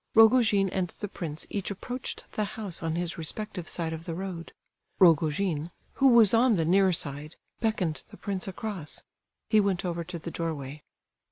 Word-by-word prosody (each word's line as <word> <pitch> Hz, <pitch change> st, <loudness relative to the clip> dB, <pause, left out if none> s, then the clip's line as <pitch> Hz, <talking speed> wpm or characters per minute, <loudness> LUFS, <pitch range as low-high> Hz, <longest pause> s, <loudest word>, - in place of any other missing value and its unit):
Rogojin 220 Hz, -3 st, +6 dB
and 185 Hz, -2 st, 0 dB
the 205 Hz, -, -3 dB
prince 160 Hz, -6 st, -6 dB
each 200 Hz, -3 st, -2 dB
approached 245 Hz, +6 st, -5 dB
the 215 Hz, -, -1 dB
house 200 Hz, -6 st, -3 dB
on 165 Hz, -1 st, -1 dB
his 170 Hz, -1 st, -2 dB
respective 180 Hz, +2 st, -4 dB
side 165 Hz, -2 st, -1 dB
of 160 Hz, +1 st, -7 dB
the 165 Hz, -, -4 dB
road; 180 Hz, -2 st, -5 dB, 0.5 s
Rogojin, 165 Hz, -1 st, +3 dB, 0.2 s
who 270 Hz, -, +4 dB
was 235 Hz, -5 st, +7 dB
on 235 Hz, 0 st, +5 dB
the 165 Hz, -3 st, +1 dB
near 190 Hz, +3 st, +4 dB
side, 150 Hz, -1 st, -2 dB, 0.2 s
beckoned 200 Hz, -8 st, -1 dB
the -, -, -13 dB
prince 195 Hz, -2 st, -3 dB
across. 190 Hz, -5 st, -5 dB, 0.5 s
He 215 Hz, -, +6 dB
went 195 Hz, -3 st, +1 dB
over 170 Hz, -1 st, -2 dB
to 175 Hz, +1 st, -6 dB
the 170 Hz, +1 st, -7 dB
doorway. 150 Hz, -4 st, -4 dB
180 Hz, 170 wpm, -28 LUFS, 165-205 Hz, 0.5 s, was